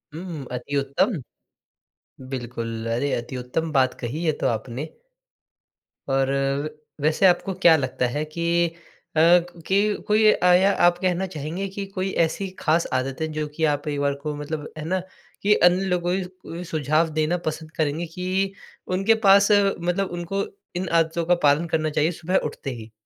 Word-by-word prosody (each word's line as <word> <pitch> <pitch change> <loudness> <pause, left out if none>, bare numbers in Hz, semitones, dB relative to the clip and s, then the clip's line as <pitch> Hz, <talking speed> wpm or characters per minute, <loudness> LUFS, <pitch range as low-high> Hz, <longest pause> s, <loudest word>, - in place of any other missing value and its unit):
हुँ, 165 - -6
हुँ, 160 -7 -6
अति 125 +3 -4
उत्तम। 140 - 0 1.1
बिल्कुल, 115 -3 -4
अरे, 140 +4 -1
अति 120 +2 -4
उत्तम 125 +6 -3
बात 130 -3 +3
कही 140 +8 -4
ये 155 - +3
तो - - +1
आपने। 120 +4 -2 1.3
और 135 0 +2 0.3
व 155 - -3 0.3
वैसे 155 +5 +3
आपको 185 +1 +3
क्या 175 -3 +6
लगता 130 -2 -1
है 145 +5 -2
कि 170 +2 +1 0.5
अ, - - +3
कि 175 +4 +3
कोई 215 0 +5
आया 180 +2 +5
आप 175 0 +5
कहना 185 0 0
चाहेंगे 170 +3 -4
कि 195 +1 -5
कोई 190 0 -1
ऐसी 195 +4 -4
ख़ास 165 +2 +2
आदत 130 +2 -2
है, 160 - 0
जो 155 -1 -3
कि 160 - -3
आप 145 0 -2
परिवार 145 -1 0
को 150 +1 -3
मतलब 150 +1 -5
है 155 - -5
ना 185 +2 0 0.4
कि 210 +1 +5
अन्य 180 +2 +2
लोगों 180 -1 0 0.4
उ - - -5
सुझाव 155 +1 +1
देना 155 +3 +1
पसंद 155 0 -4
करेंगे 155 +2 0
कि 190 +2 -1 0.4
उनके 205 +4 +4
पास 200 +1 +7
मतलब 195 -2 +2
उनको 195 +3 -2 0.3
इन 180 +1 -2
आदतों 165 0 +1
का 180 +2 +4
पालन 145 +3 +4
करना 155 -1 +1
चाहिए, 155 +2 +1
सुबह 175 +2 -1
उठते 145 -2 -5
ही? 115 -2 -10
160 Hz, 165 wpm, -24 LUFS, 145-180 Hz, 1.3 s, पास